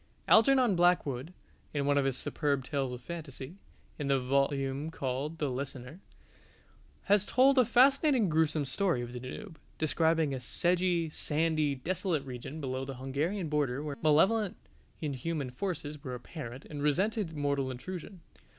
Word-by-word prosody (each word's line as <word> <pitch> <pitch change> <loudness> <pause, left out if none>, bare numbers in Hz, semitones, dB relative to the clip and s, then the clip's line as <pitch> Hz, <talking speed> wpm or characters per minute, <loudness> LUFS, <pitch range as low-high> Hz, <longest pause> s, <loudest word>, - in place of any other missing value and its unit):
Algernon 245 -2 +5
Blackwood, 170 -5 +2 0.4
in 140 -1 0
one 145 0 +3
of 140 -1 +2
his 135 -2 0
superb 140 -3 -1
tales 135 -2 -2
of 125 0 -7
fantasy 155 -1 -7 0.4
(in 145 - -2
the 135 -1 +3
volume 135 +2 0
called 140 +1 -3
"The 150 - -1
Listener") 130 +3 -5 1.0
has 205 -1 +4
told 260 +5 +4
a 250 - +6
fascinating 260 0 +4
gruesome 155 -2 +2
story 135 -1 0
of 120 0 -7
the 125 - -5
Danube, 155 +7 -8 0.2
describing 160 -1 +2
a 130 - -3
sedgy, 175 +4 +1
sandy, 155 -2 +1
desolate 165 +1 -2
region 130 +4 -7
below 130 -2 -3
the 135 0 -6
Hungarian 150 +9 -2
border 145 -3 0
where 145 -2 -5
malevolent 190 +7 +3 0.4
inhuman 145 -1 -3
forces 150 -1 -4
were 125 -1 -4
apparent 125 0 -8
and 145 -2 -7
resented 180 +4 0
mortal 140 -2 0
intrusion. 180 +8 -7
150 Hz, 145 wpm, -31 LUFS, 135-175 Hz, 1.0 s, a